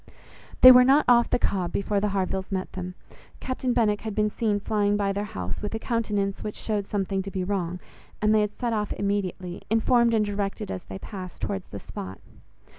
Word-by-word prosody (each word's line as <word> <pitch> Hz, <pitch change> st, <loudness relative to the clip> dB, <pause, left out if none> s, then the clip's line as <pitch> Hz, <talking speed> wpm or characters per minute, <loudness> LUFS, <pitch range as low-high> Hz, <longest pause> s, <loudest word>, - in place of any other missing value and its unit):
They 255 Hz, -, +12 dB
were 250 Hz, 0 st, +8 dB
not 275 Hz, +4 st, +5 dB
off 240 Hz, -1 st, +5 dB
the -, -, +2 dB
Cobb, 185 Hz, -7 st, -1 dB
before 200 Hz, +1 st, 0 dB
the 210 Hz, -, 0 dB
Harvilles 190 Hz, -1 st, -2 dB
met 185 Hz, -1 st, -3 dB
them. 180 Hz, -1 st, -6 dB, 0.4 s
Captain 255 Hz, -1 st, -2 dB
Benwick 210 Hz, -4 st, +2 dB
had 220 Hz, -2 st, -5 dB
been 210 Hz, 0 st, +1 dB
seen 210 Hz, -2 st, 0 dB
flying 205 Hz, 0 st, +1 dB
by 200 Hz, -1 st, 0 dB
their 205 Hz, +1 st, -2 dB
house, 95 Hz, -, -5 dB
with 210 Hz, +1 st, -3 dB
a -, -, 0 dB
countenance 210 Hz, -4 st, -1 dB
which 210 Hz, -, -5 dB
showed 205 Hz, -3 st, -2 dB
something 195 Hz, -1 st, -1 dB
to 195 Hz, -, -6 dB
be 190 Hz, -1 st, -3 dB
wrong; 180 Hz, -2 st, -2 dB, 0.4 s
and 215 Hz, +1 st, +3 dB
they 215 Hz, -, +4 dB
had 210 Hz, 0 st, -2 dB
set 240 Hz, -2 st, -1 dB
off 210 Hz, -2 st, -1 dB
immediately, 190 Hz, -3 st, -3 dB
informed 230 Hz, +1 st, +3 dB
and 215 Hz, -1 st, +2 dB
directed 200 Hz, -, -3 dB
as 95 Hz, -, -6 dB
they 95 Hz, -, -7 dB
passed, 185 Hz, -, -9 dB
towards 195 Hz, -2 st, -3 dB
the 100 Hz, -, -7 dB
spot. 95 Hz, -1 st, -8 dB
205 Hz, 205 wpm, -26 LUFS, 190-220 Hz, 0.4 s, They